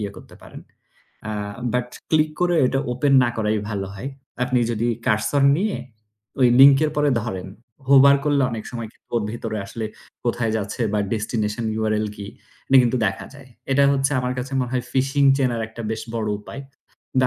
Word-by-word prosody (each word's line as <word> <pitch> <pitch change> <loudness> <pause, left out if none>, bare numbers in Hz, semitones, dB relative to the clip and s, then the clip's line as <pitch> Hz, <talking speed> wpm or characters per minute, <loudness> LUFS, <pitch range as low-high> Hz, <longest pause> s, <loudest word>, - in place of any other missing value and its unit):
ইয়ে 100 -1 -3
করতে - - -13
পারেন। - - -11 0.7
আ - - -3 0.4
But 125 0 0 0.2
click 155 -1 +3
করে 175 -1 +2
ওইটা 135 +1 +1
open 135 +3 +1
না 120 - +1
করাই 110 -1 0
ভালো 100 -2 -3
হয়। 110 +7 -6 0.4
আপনি 125 0 +1
যদি 115 +1 -1 0.2
cursor 110 +6 +1 0.2
নিয়ে 205 +2 -1 0.6
ওই 125 - +6
link 140 0 +9
এর 155 - +1
পরে 150 -1 +2
ধরেন, 95 -5 -5 0.4
hover 140 0 +7
করলে 145 -2 +2
অনেক 110 -2 -5
সময় 115 -3 -6
কিন্তু - - -36
ওর 115 - +1
ভিতরে 110 -2 -4
আসলে 110 +2 -6 0.4
কোথায় 115 -2 0
যাচ্ছে? 105 +3 -3
বা 105 - +1 0.2
destination 110 0 -2 0.2
URL 110 0 0
কি? 100 -1 -7 0.4
এটা 135 - +6
কিন্তু 120 +1 +1
দেখা 95 0 -3
যায়। 140 -2 -14 0.2
এটা 140 +1 +4
হচ্ছে 135 +1 +1
আমার 125 0 -2
কাছে 130 +2 -5
মনে 125 -1 -3
হয় 125 - -1
phishing 135 +1 +3
চেনার 120 -4 0
একটা 115 +1 -9
বেশ 110 - -3
বড় 110 -2 -2
উপায় 135 +6 -9 0.6
বা 130 - +4
120 Hz, 185 wpm, -22 LUFS, 110-135 Hz, 0.7 s, link